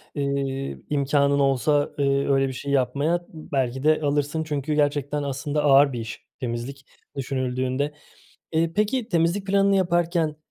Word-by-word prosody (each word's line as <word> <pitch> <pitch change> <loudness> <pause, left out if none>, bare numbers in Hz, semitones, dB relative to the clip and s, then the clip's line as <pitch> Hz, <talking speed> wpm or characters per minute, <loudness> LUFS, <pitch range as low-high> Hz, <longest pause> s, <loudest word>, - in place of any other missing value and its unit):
eee, 140 -1 -2
imkânın 140 0 +2
olsa, 140 +2 +2
ııı, 140 0 +2
öyle 135 0 +3
bir 130 - -4
şey 140 +3 -5
yapmaya 140 +6 +1
belki 135 -5 -3
de 155 0 +3
alırsın. 145 +2 0
Çünkü 150 -1 -2
gerçekten 145 0 0
aslında 145 +2 -2
ağır 140 -1 +5
bir 120 - -3
iş 110 -1 -7
temizlik, 125 +3 -5 0.3
düşünüldüğünde. 130 +1 -2 0.6
Eee, 165 +1 +1
peki 220 +3 0
temizlik 170 +2 +1
planını 200 0 +3
yaparken, 170 -3 +1
145 Hz, 135 wpm, -24 LUFS, 135-155 Hz, 0.6 s, ağır